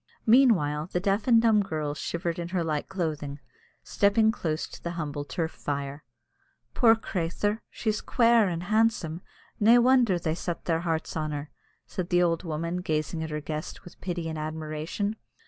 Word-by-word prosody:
Meanwhile, 190 Hz, -, +4 dB
the 180 Hz, -, 0 dB
deaf 200 Hz, +4 st, 0 dB
and 235 Hz, -2 st, +7 dB
dumb 225 Hz, -2 st, +4 dB
girl 155 Hz, -6 st, -2 dB
shivered 170 Hz, +2 st, -3 dB
in 170 Hz, -, -3 dB
her 180 Hz, -1 st, -1 dB
light 155 Hz, -2 st, -2 dB
clothing, 155 Hz, -6 st, -3 dB, 0.4 s
stepping 215 Hz, +2 st, +3 dB
close 160 Hz, -8 st, -2 dB
to -, -, -12 dB
the 170 Hz, -, -4 dB
humble 145 Hz, -3 st, -3 dB
turf 160 Hz, +4 st, -3 dB
fire. 140 Hz, 0 st, -4 dB, 0.7 s
"Poor 225 Hz, -2 st, +6 dB
crathur, 205 Hz, +1 st, -2 dB
she's 215 Hz, -2 st, -2 dB
quare 230 Hz, -3 st, +4 dB
and 170 Hz, -1 st, -3 dB
handsome! 210 Hz, -5 st, +1 dB, 0.4 s
Nae 225 Hz, +3 st, +7 dB
wonder 245 Hz, -5 st, +4 dB
they 165 Hz, -2 st, -1 dB
set 170 Hz, 0 st, -4 dB
their 165 Hz, -2 st, +1 dB
hearts 165 Hz, -2 st, -2 dB
on 155 Hz, -1 st, -1 dB
her," 145 Hz, 0 st, -5 dB, 0.3 s
said 180 Hz, -1 st, -5 dB
the 175 Hz, 0 st, +4 dB
old 165 Hz, -1 st, +1 dB
woman, 170 Hz, +1 st, -3 dB
gazing 160 Hz, -2 st, -2 dB
at 160 Hz, -, -4 dB
her 150 Hz, 0 st, -3 dB
guest 155 Hz, +1 st, -6 dB
with 175 Hz, -, -14 dB
pity 175 Hz, -3 st, -3 dB
and 160 Hz, -1 st, -4 dB
admiration. 155 Hz, +7 st, -3 dB
170 Hz, 170 wpm, -27 LUFS, 155-205 Hz, 0.7 s, and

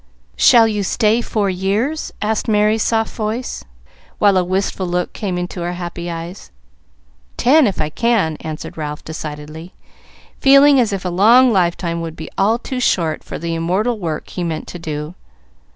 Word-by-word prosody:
"Shall 235 Hz, -3 st, +6 dB
you 210 Hz, -2 st, -1 dB
stay 215 Hz, +4 st, +1 dB
four 205 Hz, -4 st, -1 dB
years?" 205 Hz, +12 st, -1 dB
asked 220 Hz, 0 st, -1 dB
Merry's 215 Hz, 0 st, +2 dB
soft 225 Hz, 0 st, 0 dB
voice, 220 Hz, -, -3 dB, 0.5 s
while 205 Hz, -2 st, +4 dB
a 185 Hz, -, +3 dB
wistful 185 Hz, +1 st, -2 dB
look 180 Hz, 0 st, -2 dB
came 190 Hz, -5 st, -3 dB
into 180 Hz, 0 st, -4 dB
her 175 Hz, +1 st, -2 dB
happy 175 Hz, -1 st, -6 dB
eyes. 170 Hz, +3 st, -7 dB, 0.9 s
"Ten, 280 Hz, +3 st, +5 dB
if 195 Hz, -, -3 dB
I 155 Hz, -1 st, -1 dB
can," 220 Hz, -7 st, +1 dB
answered 155 Hz, 0 st, -7 dB
Ralph, 150 Hz, -1 st, -5 dB
decidedly, 155 Hz, +2 st, -8 dB, 0.6 s
feeling 275 Hz, 0 st, +6 dB
as 230 Hz, -4 st, +2 dB
if 195 Hz, -2 st, -4 dB
a -, -, 0 dB
long 230 Hz, +7 st, +5 dB
lifetime 170 Hz, -2 st, 0 dB
would 165 Hz, -1 st, -6 dB
be 160 Hz, -, -9 dB
all 215 Hz, +4 st, +2 dB
too 255 Hz, +1 st, -5 dB
short 165 Hz, -9 st, 0 dB
for -, -, -7 dB
the 165 Hz, +1 st, -4 dB
immortal 190 Hz, +8 st, -1 dB
work 160 Hz, -5 st, -4 dB
he 180 Hz, -, -4 dB
meant 160 Hz, -2 st, -4 dB
to 175 Hz, -, -8 dB
do. 150 Hz, 0 st, -5 dB
185 Hz, 170 wpm, -18 LUFS, 165-225 Hz, 0.9 s, Shall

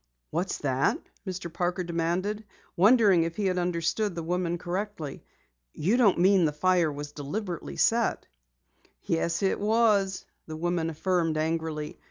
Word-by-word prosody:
"What's 180 Hz, +3 st, -1 dB
that?" 135 Hz, -2 st, +1 dB, 0.3 s
Mr. 185 Hz, -2 st, -5 dB
Parker 180 Hz, +1 st, -1 dB
demanded, 175 Hz, +5 st, -1 dB, 0.3 s
wondering 205 Hz, -2 st, +5 dB
if 165 Hz, 0 st, -2 dB
he 210 Hz, -, -2 dB
had 185 Hz, -1 st, +1 dB
understood 175 Hz, +3 st, -1 dB
the 170 Hz, -, -4 dB
woman 175 Hz, 0 st, -1 dB
correctly. 180 Hz, -4 st, -5 dB, 0.5 s
"You 190 Hz, +10 st, +1 dB
don't 230 Hz, -7 st, +4 dB
mean 185 Hz, 0 st, +4 dB
the 150 Hz, -, +1 dB
fire 175 Hz, +1 st, +2 dB
deliberately 145 Hz, +6 st, -5 dB
was -, -, +2 dB
set?" 230 Hz, 0 st, +1 dB, 0.8 s
"Yes, 170 Hz, +2 st, -1 dB
it 195 Hz, -, +1 dB
was," 210 Hz, -3 st, +2 dB, 0.2 s
the 155 Hz, -1 st, -6 dB
woman 170 Hz, 0 st, -1 dB
affirmed 165 Hz, 0 st, 0 dB
angrily. 160 Hz, -1 st, -2 dB
175 Hz, 140 wpm, -27 LUFS, 165-195 Hz, 0.8 s, wondering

